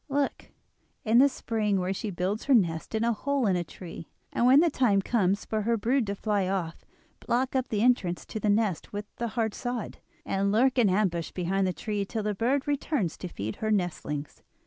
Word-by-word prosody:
Look, 280 0 -1 0.6
in 225 +2 +5
the 280 +2 +7
spring, 215 -6 -1
where 185 +1 -1
she 210 +2 -4
builds 190 +3 -2
her 275 - +5
nest 170 -2 +1
in 220 - +1
a 235 0 +2
hole 280 +3 -1
in 190 -3 +3
a 175 - 0
tree, 165 -1 -10 0.2
and 240 - +3
when 265 +3 +7
the 335 0 +4
time 230 -8 +3
comes 195 -2 +1
for 215 -1 -1
her 230 +2 +1
brood 235 +2 +1
to 200 - -2
fly 205 -2 0
off 180 -4 -3 0.4
block 255 +3 0
up 260 -1 +1
the 210 -1 0
entrance 200 -8 +2
to 220 - -5
the 210 - 0
nest 205 -5 +1
with 205 0 -4
a 235 - -1
hard 220 -1 -1
sod, 245 -3 -4 0.3
and 195 +1 0
lurk 255 +4 +3
in 220 -5 +5
ambush 185 -4 0
behind 190 +2 0
the - - +1
tree 210 -1 -2
till 215 +2 -4
the 210 0 0
bird 255 +8 0
returns 280 - -1
to 180 - -5
feed 110 - -5
her 215 - -2
nestlings. 165 -7 -2
210 Hz, 215 wpm, -28 LUFS, 190-240 Hz, 0.6 s, the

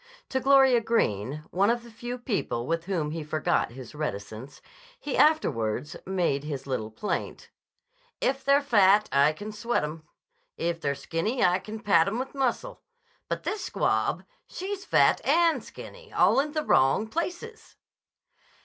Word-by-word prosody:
To 260 - 0
Gloria 265 -2 +5
Greene, 145 - -1
one 195 +3 +2
of 235 0 0
the 235 - -13
few 240 +2 -6
people 205 - -2
with 165 +3 -2
whom 170 -6 -2
he 160 0 -4
forgot 150 -5 0
his 130 0 -10
reticence, 110 -3 -6 0.4
he 290 - -4
afterwards 130 - +1
made 175 -7 0
his 145 -3 -5
little 130 -5 -3
plaint. 110 - -4 0.7
"If 270 0 0
they're 280 +1 +4
fat, 210 -5 +4
I 140 +2 +4
can 205 +7 -8
sweat 230 0 -1
'em. 155 +1 -6 0.5
If 170 -1 -2
they're 140 -1 -1
skinny, 210 - -1
I 180 +1 +3
can 215 +3 -8
pad 170 -6 +4
'em 210 +4 -1
with 260 +2 -4
muscle. 275 - -2 0.5
But - - -3
this 425 - -3
squab, - - 0 0.2
she's 390 +1 -6
fat - - +3
and 335 -1 +3
skinny - - -12
all - - +4
in 295 +2 -1
the 310 -1 -1
wrong 135 +11 +3
places." 360 - -5
200 Hz, 155 wpm, -27 LUFS, -, 0.7 s, Gloria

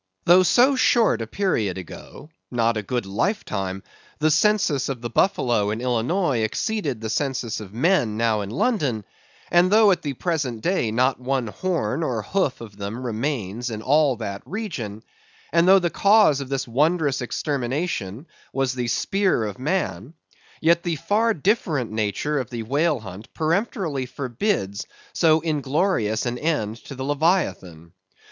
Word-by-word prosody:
Though 175 +2 +7
so 250 +9 +4
short 230 - +3
a 115 - -4
period 110 - -1
ago—not 115 - -4
a 105 - -1
good 120 +2 -3
lifetime—the 100 - -3
census 155 -6 +2
of 135 -3 -3
the 120 -1 -5
buffalo 120 - +2
in 110 +2 -2
Illinois 125 - 0
exceeded 140 - -1
the 110 - -3
census 130 -6 -2
of 105 -3 -9
men 120 - +1
now 115 -2 +1
in 100 - -5
London, 130 - 0 0.5
and 175 +1 +5
though 215 0 +6
at 175 -2 +1
the 145 -4 -3
present 135 -7 -2
day 180 - +1
not 130 +4 +1
one 130 0 -1
horn 155 - -2
or 120 -9 -1
hoof 185 - -1
of 105 -4 -10
them 105 +5 -5
remains 120 -2 -3
in 110 -1 -6
all 145 -1 +3
that 100 -3 -5
region; 135 - -5 0.5
and 170 +1 +4
though 190 +1 +8
the 175 -3 0
cause 200 -9 +4
of 135 - -7
this 135 -1 -2
wondrous 145 +2 +1
extermination 130 - -3 0.3
was 135 -1 0
the 125 -1 -3
spear 195 - +1
of 105 0 -5
man; 150 - -2 0.5
yet 170 +1 +4
the 170 -1 -2
far 205 +9 +1
different 160 - 0
nature 110 +7 -1
of 125 - -4
the 120 -2 -5
whale 145 +3 +1
hunt 95 +1 -10
peremptorily 160 - -1
forbids 125 - -2 0.3
so 160 -2 +3
inglorious 145 - 0
an 120 0 -2
end 115 -9 -1
to 135 - -10
the 130 - -5
Leviathan. 140 - -1
135 Hz, 155 wpm, -23 LUFS, 110-170 Hz, 0.5 s, though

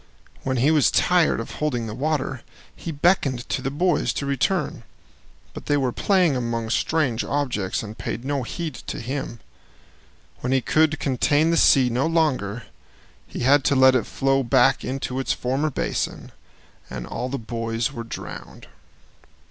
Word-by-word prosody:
When 130 -1 -1
he 135 +6 +3
was 155 -3 +4
tired 180 -7 +3
of 115 - -6
holding 125 -6 -2
the 110 - -5
water, 135 -1 -2 0.3
he 165 - -6
beckoned 145 -6 +1
to 135 - -1
the 135 - -2
boys 175 +6 +1
to 140 - -3
return, 140 +3 -1 0.7
but - - -9
they 145 - +3
were 130 -3 0
playing 180 - +2
among 115 -2 -2
strange 135 -5 +1
objects 125 -11 -2
and 110 0 -8
paid 120 +2 -5
no 140 -1 -1
heed 160 +5 -4
to - - -7
him. 125 -1 -5 1.0
When 125 - -3
he 135 - +4
could 155 +4 +2
contain 145 +4 +2
the - - +2
sea 130 -6 +5
no 125 +6 +1
longer, 130 -10 0 0.6
he - - -6
had 135 +3 +4
to 140 - +3
let 130 0 +6
it 125 -5 +1
flow 135 0 +1
back 130 +1 +3
into 130 0 -3
its 135 - 0
former 135 +5 -1
basin, 140 - -3 0.6
and - - -6
all 125 - -4
the 140 - -3
boys 115 0 -3
were 115 - -5
drowned. 115 - -9
135 Hz, 165 wpm, -23 LUFS, 120-150 Hz, 1.0 s, let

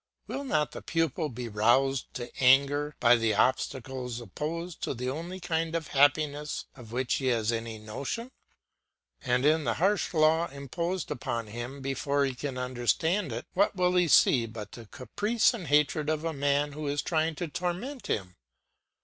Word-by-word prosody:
Will 280 - -4
not 155 - 0
the - - -8
pupil 165 -2 -1
be 125 -1 -6
roused 120 +5 +2
to 120 -1 -5
anger 140 +3 +4
by 120 0 +6
the 115 -2 +1
obstacles 130 +1 -1
opposed 160 - -5
to - - -2
the 125 +2 -2
only 170 +6 -6
kind 165 -2 -1
of 165 -2 -3
happiness 145 +1 +2
of 120 -5 -12
which 125 +1 -1
he 135 - -2
has 115 -3 +1
any 115 -1 -4
notion? 135 - -5 0.9
And 125 0 +1
in 155 +1 +4
the - - 0
harsh 195 +4 +1
law 160 +2 +4
imposed 170 +6 -4
upon 115 -1 -3
him 120 +6 -7
before 140 +1 0
he 135 - -2
can 130 +1 -5
understand 130 - 0
it, 115 +1 -5
what 200 +2 +2
will 180 -1 +2
he 180 -1 +4
see 125 -5 +5
but 110 -2 -8
the 115 -2 -11
caprice 210 - +1
and 190 -9 -6
hatred 150 +1 +2
of 155 +1 -1
a 165 - -1
man 145 +1 +1
who 150 +1 -5
is 145 0 -1
trying 160 -1 0
to 175 +3 -3
torment 180 - -4
him? 90 -3 -2
140 Hz, 175 wpm, -29 LUFS, 125-165 Hz, 0.9 s, by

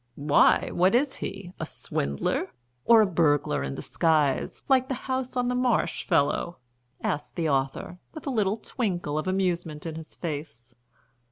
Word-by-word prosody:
"Why, 145 0 +3
what 185 +5 +3
is 265 +2 +2
he? 195 -2 -6
A - - -2
swindler? 70 0 -2 0.4
Or 230 -2 +7
a - - +3
burglar 145 - +2
in 70 0 -3
disguise, 155 -4 0
like 260 -2 +3
the 265 - -2
House 260 -1 -2
on 245 0 +1
the 250 - 0
Marsh 250 -1 0
fellow?" 170 +1 +1 0.5
asked 145 - -2
the 165 -3 0
author, 135 +5 -1
with 315 - -10
a 280 - -1
little 210 -3 +1
twinkle 180 - -2
of 155 - -4
amusement 175 -5 -1
in 165 - -4
his 160 0 -9
face. 145 -7 -6
175 Hz, 160 wpm, -26 LUFS, 150-225 Hz, 0.5 s, Or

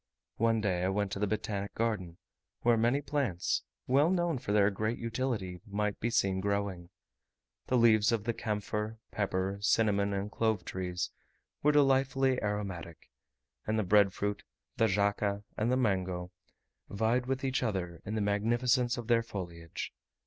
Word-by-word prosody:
One 115 -1 +2
day 95 -4 0
I - - +2
went 100 0 0
to 100 - -3
the 105 - +1
Botanic 100 -1 -3
Garden, 105 -7 -1 0.4
where 120 -1 +4
many 120 +5 +2
plants, 135 - 0 0.2
well 140 +5 +4
known 175 -6 +1
for 100 - -4
their 105 0 +4
great 110 +4 -1
utility, 115 -6 -3
might 105 0 -1
be 115 - 0
seen 95 -4 +1
growing. 100 -3 -2 0.8
The 125 - +2
leaves 110 -2 +5
of 115 -3 0
the 120 - -1
camphor, 105 0 -3
pepper, 95 -1 -1
cinnamon, 100 -2 +2
and 100 +1 -2
clove 110 -6 0
trees 90 -1 -3 0.5
were 150 - +4
delightfully 135 -2 +3
aromatic; 100 -6 -4 0.6
and 110 +1 +1
the 110 - +2
bread 100 +1 +5
fruit, 100 +2 -2 0.3
the 115 - +3
jaca, 100 0 +1
and 110 +3 0
the 130 - +3
mango, 95 -6 0 0.6
vied 115 +5 +1
with 135 +1 -1
each 135 0 0
other 95 -8 -2
in 105 - -4
the 110 - 0
magnificence 120 +4 +2
of 120 - -5
their 115 0 +3
foliage. 85 -7 -6
105 Hz, 155 wpm, -31 LUFS, 100-120 Hz, 0.8 s, leaves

